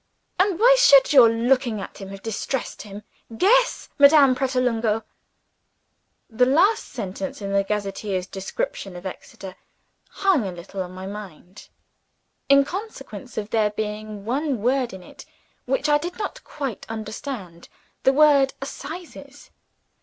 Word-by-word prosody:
"And 375 -2 +2
why - - +6
should 280 - +6
your 250 -5 +8
looking 235 0 +1
at 195 - -9
him 195 - -7
have 195 0 -10
distressed 225 +4 -4
him? 205 0 -10 0.3
Guess, - - +3
Madame 280 -2 +7
Pratolungo!" 245 -4 0 1.2
The 250 +2 +2
last 380 - +3
sentence 270 +9 -6
in 200 -1 -5
the 200 0 +2
gazetteer's 195 -2 -3
description 190 0 -5
of 175 +2 -10
Exeter 190 0 -9 0.5
hung 385 - +1
a - - -4
little 180 +2 -7
on 180 -1 -6
my 185 +1 -8
mind 195 -2 -10 0.8
in 275 0 +6
consequence 375 - -8
of 210 0 -4
there 215 -2 +2
being 210 -1 -5
one 265 -1 -1
word 255 0 +1
in 190 -1 -10
it - - -13 0.4
which 270 +3 0
I 295 0 +4
did 350 +4 -6
not 410 - -5
quite 270 -8 -6
understand 215 -5 -7 0.3
the 265 - +4
word 280 -1 +4
"Assizes." 285 0 -9
240 Hz, 140 wpm, -23 LUFS, 200-280 Hz, 1.2 s, your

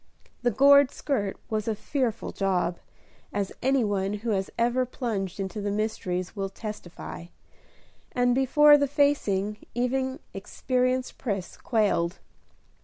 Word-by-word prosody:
The 245 - +3
gored 280 +3 +6
skirt 210 -12 -2
was 215 -1 -2
a 220 - 0
fearful 245 +1 -2
job, 180 -3 0 0.5
as 200 -2 -2
any 265 -1 +3
one 200 -1 0
who 220 +2 -2
has 195 -2 0
ever 240 +2 +2
plunged 215 -7 -3
into 195 +2 -3
the 205 - -1
mysteries 205 -4 -2
will 195 -1 -2
testify; 195 -5 -8 0.9
and 245 0 +2
before 290 +3 +6
the 285 - +2
facing, 215 -8 +1 0.2
even 260 +2 0 0.2
experienced 255 +5 -1
Pris 200 -7 -3
quailed. 195 -6 +1
220 Hz, 125 wpm, -27 LUFS, 195-255 Hz, 0.9 s, gored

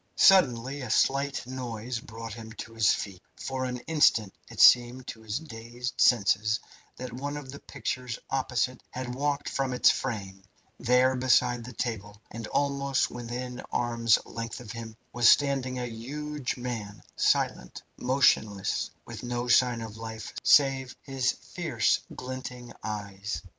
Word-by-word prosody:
Suddenly 140 -7 +5
a 125 - -5
slight 140 +4 +1
noise 125 -2 -4
brought 115 -1 -8
him 110 -1 -9
to 115 0 -8
his 110 -1 +4
feet. 95 -3 -4
For 130 -1 -3
an 125 0 -3
instant 120 -11 +3 0.2
it - - -10
seemed 125 +1 +6
to 110 - -8
his 110 +1 -3
dazed 120 -4 -6
senses 110 -1 +4 0.4
that 125 -2 -7
one 145 +4 -4
of 135 -3 -8
the 140 - -9
pictures 125 -3 -4
opposite 130 -1 0
had 125 -1 -5
walked 145 +2 -1
from 135 -2 -1
its 125 - +6
frame. 100 -7 -4 0.4
There, 125 +2 +4
beside 125 -1 +3
the 125 - -8
table, 105 -4 -4
and 115 -1 -6
almost 140 0 0
within 125 +1 -5
arm's 115 -2 +3
length 115 0 -6
of 120 -3 -9
him, 115 -2 -7 0.2
was 120 -1 +6
standing 135 -3 +3
a 125 - -2
huge 135 +5 -4
man, 115 -5 -5
silent, - - 0
motionless, 125 -7 +2 0.2
with - - -8
no 120 0 -3
sign 120 -1 +4
of 110 -1 -7
life 110 -1 -7
save 135 -2 +4
his 135 -2 0
fierce - - 0 0.2
glinting 125 -1 -7
eyes. 100 -3 -5
125 Hz, 145 wpm, -28 LUFS, 115-130 Hz, 0.4 s, seemed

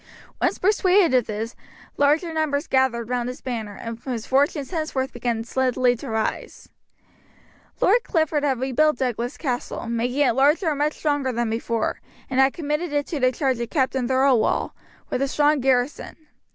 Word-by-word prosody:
Once - - +1
persuaded 380 -4 +3
of 250 -3 +3
this, 220 +2 -4 0.4
larger 305 +4 +2
numbers 310 -1 0
gathered 260 -4 +1
round 245 0 -1
his 250 - -7
banner, 220 -5 -5
and 230 +2 -7
his 240 -3 -5
fortunes 280 +2 +1
henceforth 310 -6 -2
began 235 -2 -2
steadily 250 0 +1
to 235 - -8
rise. 220 -1 -3 1.1
Lord 460 +5 +4
Clifford 315 -3 0
had 270 -4 +1
rebuilt 270 +3 +2
Douglas 245 0 -2
Castle, 250 -4 -3
making 240 +4 -1
it - - +2
larger 295 - +3
and 290 -2 -2
much 300 +1 +1
stronger 290 -4 0
than 235 -2 -1
before, 230 0 -2 0.3
and 260 - +1
had 265 +1 +5
committed 300 +1 -3
it 290 -1 0
to 310 - -3
the 255 -1 +3
charge 260 -3 -1
of 235 - -3
Captain 265 -3 0
Thirlwall, 260 -3 +2 0.4
with - - -1
a 275 - +2
strong 295 +1 +2
garrison. 260 +1 0
265 Hz, 165 wpm, -23 LUFS, 240-295 Hz, 1.1 s, had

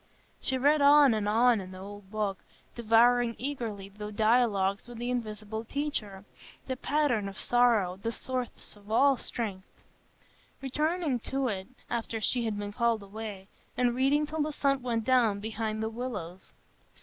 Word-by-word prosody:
She 260 - -1
read 290 +3 +3
on 285 -2 +7
and 210 -1 0
on 230 0 +4
in 185 - -9
the - - -9
old 200 0 -10
book, 205 -2 -2 0.4
devouring 235 +1 +4
eagerly 230 -8 -4
the 210 +1 -8
dialogues 215 -2 +2
with 240 -1 -9
the 240 +1 -3
invisible 220 -2 -4
Teacher, 225 -7 -4 0.4
the 260 - -3
pattern 255 -7 0
of 195 - -9
sorrow, 230 -7 +3
the 230 - -1
source 255 -1 -4
of 205 0 -17
all 270 +5 +5
strength; 205 -7 -4 0.9
returning 300 +1 -1
to 265 +2 -1
it 190 -3 -4 0.2
after 230 -1 -3
she 235 +2 0
had 215 -2 -2
been 205 0 -5
called 230 -2 +1
away, 200 -1 -7 0.3
and 245 -1 +2
reading 275 +4 +2
till 310 +1 -3
the 305 +1 0
sun 275 -2 +1
went 235 -2 -1
down 235 -5 +3
behind 220 0 -3
the - - 0
willows. 210 -7 -6
230 Hz, 160 wpm, -29 LUFS, 205-255 Hz, 0.9 s, on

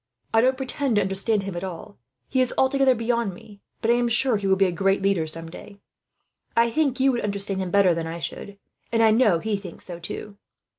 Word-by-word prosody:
"I 225 - +5
don't 260 +2 +2
pretend 265 -1 -1
to 205 - +4
understand 195 +2 0
him 195 -2 -5
at 175 - -4
all 180 -8 -8 0.3
he 260 - +1
is 255 - +1
altogether 265 -1 +3
beyond 230 -4 -1
me; 200 +2 -15 0.2
but 225 - +3
I 240 - +4
am 240 0 +1
sure 240 +1 +2
he 200 -1 -3
will 190 - +4
be 195 0 +3
a 185 - 0
great 195 +2 +1
leader, 195 -5 +1
some 165 +1 -5
day. 200 +4 -11 0.8
I 230 0 +4
think 280 -2 0
you 270 +1 +4
would 240 - -1
understand 200 -1 -2
him 185 - -3
better 190 -1 +4
than 165 0 -3
I 165 +1 -5
should, 200 +4 -7 0.3
and 230 -1 +3
I 220 - +6
know 215 -6 +4
he 210 +4 -2
thinks 190 -4 -11
so, 175 -2 -8
too. 200 +4 -7
205 Hz, 235 wpm, -24 LUFS, 190-240 Hz, 0.8 s, I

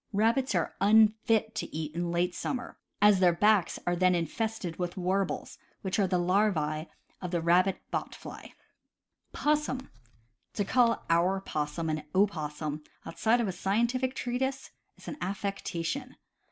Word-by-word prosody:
Rabbits 230 +3 +2
are 170 - 0
unfit 220 +1 +4
to - - -4
eat 155 -1 -4
in 175 +1 -2
late 175 +1 0
summer, 250 +5 -4 0.3
as 205 -2 +6
their 180 -2 +5
backs 210 -2 +3
are 175 - +1
then 185 0 +3
infested 185 +1 -3
with 175 0 -3
warbles, 190 +2 -1 0.2
which 190 +1 -1
are 195 - +3
the 180 0 +1
larv8e 175 -4 +1 0.3
of 180 - -4
the 170 -1 0
rabbit 180 +3 +3
bot - - -3
fly. - - -10 0.8
Possmn. 295 -3 0 0.3
— 115 +1 -43
To 205 - 0
call 235 +1 +3
our 175 +3 +3
possum 155 -2 -3
an 155 -1 -1
opossum, 155 -6 0 0.2
outside 230 +2 +1
of 225 - 0
a - - 0
scientific 235 +8 0
treatise, 265 +2 -2 0.3
is - - -15
an - - -5
affectation. 200 +5 -3
190 Hz, 150 wpm, -29 LUFS, 170-220 Hz, 0.8 s, as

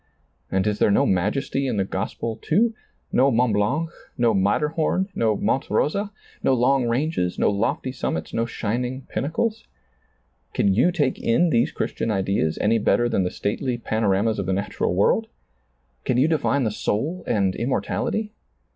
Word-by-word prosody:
And 95 0 +1
is 105 -1 0
there - - +4
no 100 - +3
majes^ 105 +10 0
in 135 -5 0
the 100 - +2
gospel, 100 +4 -3
too, 225 - +1 0.2
— - - -43
no 135 +2 +4
Mont 125 -2 +2
Blanc, 140 +11 0 0.3
no 120 -3 +3
Matterhom, 150 - +1
no 110 - +1
Monte 135 - 0
Rosa, 200 +6 0 0.3
no 130 - +3
long 125 +1 +2
ranges, 120 - 0
no - - +3
lofty 110 +5 -1
summits, 80 -10 -3
no 115 +1 0
shining 125 +4 -3
pinnacles? 215 - -2 0.9
Can 100 - +3
you 125 - +3
take 145 -7 0
in 160 +9 +2
these 115 -1 +2
Christian - - -3
ideas, 95 -6 0
any 110 +2 +3
better 120 +3 +2
than 110 - +1
the 90 - 0
stately 120 +7 -2
pano 110 -2 -1
ramas 105 +3 +1
of 95 - -3
the 95 - +1
natural 100 -2 -1
world? 215 - +2 0.8
Can 125 - 0
you 130 +4 +4
define 150 -3 +1
the 110 - 0
soul 150 - -2
and 100 -3 +1
immortality? 210 - -2
115 Hz, 165 wpm, -23 LUFS, 100-140 Hz, 0.9 s, there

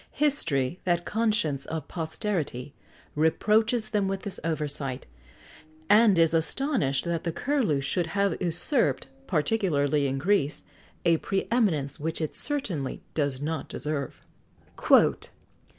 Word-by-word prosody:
History, 170 - +1
that 175 -1 0
"conscience 210 -11 0
of 160 -2 -5
posterity," 160 -6 -3 0.4
reproaches 215 +8 +2
them 205 -2 0
with 195 0 -3
this 200 -3 -4
oversight, 145 -5 -2 0.9
and 210 -2 +6
is 165 -1 +4
astonished 165 - 0
that 170 -1 -2
the 170 - -1
Curlew 210 - 0
should 165 +5 0
have 200 +3 0
usurped, 175 - 0 0.2
particularly 150 -5 +1
in 135 0 -2
Greece,[XX 150 -1 +1 0.4
89] 170 - +5
a - - +3
pre 195 -1 -2
eminence 160 - +1
which 160 +2 -2
it 155 -2 -3
certainly 195 - -3
does 140 -3 -1
not 160 +1 -3
deserve. 150 -3 -4
165 Hz, 120 wpm, -27 LUFS, 145-210 Hz, 0.9 s, and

